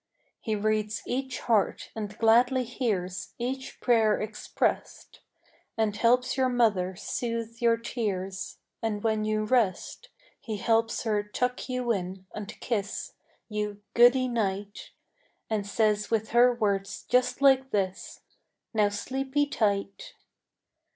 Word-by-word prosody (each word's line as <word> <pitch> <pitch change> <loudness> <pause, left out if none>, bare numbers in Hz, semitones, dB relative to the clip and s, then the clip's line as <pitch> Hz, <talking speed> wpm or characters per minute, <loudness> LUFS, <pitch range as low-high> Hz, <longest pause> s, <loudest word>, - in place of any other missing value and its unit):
He 220 -2 -2
reads 210 -1 -1
each 260 +1 -3
heart 220 -4 +1
and 210 -1 -5
gladly 245 +3 +4
hears 200 -7 -3
Each 260 +2 -4
prayer 225 -4 +3
expressed, 215 0 -3 0.6
And 220 -2 +1
helps 245 +3 +3
your 260 -1 +2
mother 205 -7 +2
soothe 230 +3 -4
your 230 -1 +4
tears; 195 -5 -4 0.2
And 215 -3 -2
when 220 -1 +1
you 215 0 0
rest, 235 - 0 0.3
He 220 -3 -5
helps 225 +2 +1
her 215 -2 +1
tuck 250 +6 -2
you 250 -1 0
in 190 -2 -3
and 210 -2 -6
kiss 210 -4 -3 0.3
You 210 -1 -3
"Goodie 245 +2 +6
Night," 205 -4 -3 0.6
And 205 -2 -1
says 210 0 +1
with 220 -1 0
her 240 +2 +6
words 200 -4 -1
just 250 +1 +2
like 265 -1 +4
this, 195 -3 -2 0.5
"Now 210 -2 +3
sleepie 265 +7 -1
tight." 200 -2 -1
220 Hz, 125 wpm, -28 LUFS, 205-245 Hz, 0.6 s, Goodie